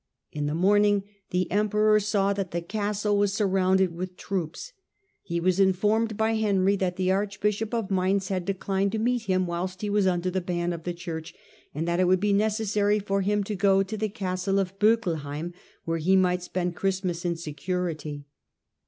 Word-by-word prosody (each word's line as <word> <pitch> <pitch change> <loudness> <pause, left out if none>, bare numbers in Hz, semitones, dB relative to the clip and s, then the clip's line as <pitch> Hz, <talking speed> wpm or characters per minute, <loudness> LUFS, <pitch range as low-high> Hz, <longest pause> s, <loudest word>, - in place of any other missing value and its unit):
In 145 -1 -2
the 150 - -1
morning 205 +3 +3 0.3
the 180 0 +1
emperor 215 +1 +3
saw 200 -1 +1
that 195 -2 -3
the 170 - -2
castle 205 +1 -1
was 200 -1 +2
surrounded 190 -3 +2
with 180 +1 -6
troops: 190 - -4 0.5
he 170 0 -3
was 185 +2 +1
informed 210 +3 +2
by 220 0 +2
Henry 200 -3 +2
that 185 -2 -1
the 185 0 +1
archbishop 210 +2 -1
of 230 -5 -2
Mainz 190 0 +1
had 185 -2 -1
declined 195 +1 -1
to - - 0
meet 240 +1 0
him 185 -2 +1
whilst 180 +2 -4
he 205 - -1
was 205 -2 +3
under 180 0 0
the 190 +1 -1
ban 175 -1 -2
of 165 -1 -8
the 175 - -2
Church, 165 -2 -6 0.4
and 160 +3 -2
that 170 +1 0
it 185 - +4
would 185 0 +4
be 205 +1 +1
necessary 210 0 +1
for 195 -1 -1
him 205 +1 +1
to 210 - -4
go 195 0 +3
to 205 +3 -5
the 215 0 -1
The - - -11
em - - -27 0.2
castlo 195 +2 +1
of 195 0 -3
BSckelhoim, 170 -7 0 0.3
where 165 0 -1
he 185 +5 +3
might 180 -1 +3
spend 180 0 -2
^'ned - - -22
at - - -14
Ohristmas 185 -3 -1
in 175 -1 0
security. 155 -2 -4
190 Hz, 200 wpm, -26 LUFS, 180-205 Hz, 0.5 s, it